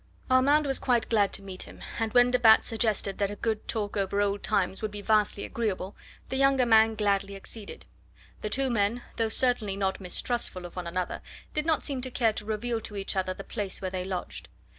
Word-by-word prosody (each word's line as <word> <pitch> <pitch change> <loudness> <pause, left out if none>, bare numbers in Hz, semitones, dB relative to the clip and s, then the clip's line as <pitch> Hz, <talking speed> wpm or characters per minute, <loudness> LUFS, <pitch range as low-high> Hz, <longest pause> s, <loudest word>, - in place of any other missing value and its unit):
Armand 285 +4 +5
was 270 -1 0
quite 240 -3 +1
glad 205 -3 +3
to 200 - -3
meet 190 -1 -7
him, - - -11 0.2
and 225 -1 0
when 245 0 +6
de 250 - +2
Batz 220 -2 +6
suggested 215 -4 0
that 200 -1 +1
a 205 - -5
good 220 0 -2
talk 210 -3 -2
over 200 0 0
old 205 0 +1
times 190 0 0
would 215 - -1
be 205 0 -7
vastly 210 -1 +2
agreeable, 205 -4 -3 0.3
the 265 - -2
younger 275 -1 +4
man 225 -1 +5
gladly 200 -2 0
acceded. 200 +2 -7 0.6
The 215 - -3
two 265 +3 +1
men, 230 +2 +1
though 225 -1 +1
certainly 225 -4 +1
not 195 0 -1
mistrustful 185 0 -1
of 175 - -10
one 180 -2 -4
another, 180 +1 -3 0.3
did 305 +1 -1
not 320 -2 +2
seem 275 -3 -3
to 260 - -3
care 230 -3 +1
to 210 - -4
reveal 225 +2 -2
to 210 - -7
each 200 0 -2
other 185 -1 -1
the 195 - -8
place 205 -4 -4
where 185 -1 -4
they 185 -1 -3
lodged. 185 -1 -5
215 Hz, 215 wpm, -28 LUFS, 195-240 Hz, 0.6 s, when